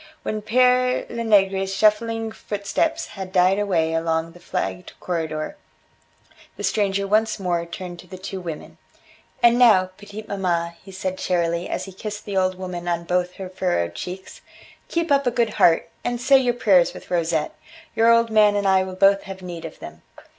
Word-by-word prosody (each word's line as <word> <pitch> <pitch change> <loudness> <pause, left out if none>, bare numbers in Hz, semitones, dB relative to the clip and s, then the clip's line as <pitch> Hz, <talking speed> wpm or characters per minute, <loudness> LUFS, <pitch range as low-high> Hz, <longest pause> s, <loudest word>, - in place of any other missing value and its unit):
When 215 0 -3
Pere 250 +3 +3
Lenegre's 195 -4 +2
shuffling 220 +2 +1
footsteps 220 +10 -2
had 190 -2 -7
died 185 +1 +3
away 170 -6 +1
along 165 0 -1
the 175 - -16
flagged 175 0 -4
corridor, 160 - -3 1.0
the - - -6
stranger 200 -2 0
once 215 +2 +1
more 175 -3 -1
turned 175 0 -8
to 180 - -13
the 185 +1 -9
two 190 0 -6
women. 165 -4 -8 0.6
"And 235 +1 +6
now, 190 -7 +5
petite 210 +1 -9
maman," 175 -4 -1
he 195 - -13
said 185 0 -4
cheerily, 170 -1 -1
as - - -3
he 190 - -10
kissed 210 +2 -7
the 200 - -5
old 185 -1 +1
woman 180 -2 -6
on 170 -1 -1
both 180 +1 -1
her 190 - -6
furrowed 180 - -1
cheeks, 180 - -8 0.5
"keep 335 -2 -2
up 280 -2 +3
a - - +5
good 235 -1 0
heart, 165 -1 +3 0.2
and 245 0 -2
say 270 +2 +5
your 245 -2 0
prayers 190 -7 +3
with - - -12
Rosette. 165 -3 0 0.4
Your 230 +1 +5
old 230 0 +3
man 210 -1 +5
and 200 -1 0
I 190 -1 +4
will 185 0 -7
both 195 +1 +4
have 190 -1 -8
need 170 -2 -7
of 160 - -8
them." 75 0 -11
190 Hz, 180 wpm, -22 LUFS, 175-215 Hz, 1.0 s, And